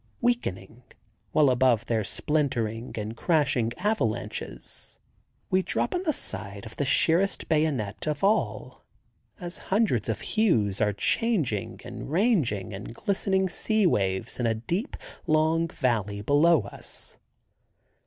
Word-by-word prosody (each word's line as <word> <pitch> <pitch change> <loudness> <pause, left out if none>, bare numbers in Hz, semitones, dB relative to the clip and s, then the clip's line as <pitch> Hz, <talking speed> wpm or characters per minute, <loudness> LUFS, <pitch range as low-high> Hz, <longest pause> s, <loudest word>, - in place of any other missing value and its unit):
Weakening, 125 - -1 0.5
while 145 0 +4
above 125 -3 +3
their 110 -2 0
splintering 120 -4 -1
and 110 +1 -4
crashing 140 -7 +1
avalanches, 120 - -3 0.5
we 185 - +4
drop - - -1
on 360 - 0
the 340 -4 +1
side 100 - -4
of 115 - -10
the 145 - 0
sheerest 175 +8 +3
bayonet 150 -9 0
of 150 +1 -2
all, 210 +3 0 0.6
as 175 -1 -4
hundreds 190 - +2
of 110 - -2
hues 115 - +1
are 105 -1 +3
changing 120 - +1
and 120 +1 -7
ranging 160 - +1
in 100 +1 -7
glistening 190 - 0
sea 215 +3 +1
waves 100 - 0
in 120 - +1
a 115 - +1
deep, 170 - -3 0.3
long 160 +2 +3
valley 110 - -1
below 145 +6 +4
us. 100 - -8
135 Hz, 125 wpm, -27 LUFS, 110-180 Hz, 0.6 s, while